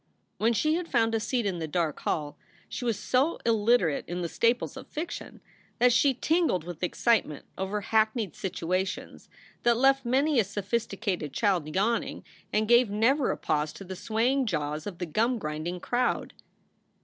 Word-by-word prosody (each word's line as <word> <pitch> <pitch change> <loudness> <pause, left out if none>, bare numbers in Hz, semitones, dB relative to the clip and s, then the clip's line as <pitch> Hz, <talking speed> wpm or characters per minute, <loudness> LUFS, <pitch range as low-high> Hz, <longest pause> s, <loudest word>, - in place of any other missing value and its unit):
When 225 +2 +3
she 305 +7 +2
had 340 +1 -1
found 225 -5 +2
a 225 - +2
seat 235 +1 -1
in 185 -4 -1
the 160 - -3
dark 160 -1 -1
hall 150 -2 -2 0.3
she 260 - -6
was 230 -4 0
so 260 +9 +1
illiterate 220 -8 +3
in 175 +1 -3
the - - -1
staples 235 +7 +1
of - - -9
fiction 320 +3 -6 0.4
that 245 0 +5
she 270 +1 +4
tingled 315 - +1
with 175 -1 -8
excite 225 +5 +2
ment 150 - -9
over 195 +2 -2
hackneyed 220 - +1
situations 185 0 -3 0.3
that 235 -1 +3
left 270 +2 +4
many 270 +3 +2
a - - +5
sophisti 205 +4 -3
cated 175 -9 -2
child 180 -7 0
yawning 225 +5 0 0.3
and 215 +1 +1
gave 240 0 +5
never 240 +7 +2
a - - -1
pause 150 0 -1
to - - -10
the 190 0 -7
swaying 240 +7 0
jaws 150 -3 -2
of 190 -4 -6
the 175 - -3
gum 225 +10 +1
grinding 155 0 -4
crowd. 245 +7 -1
215 Hz, 175 wpm, -28 LUFS, 175-245 Hz, 0.4 s, that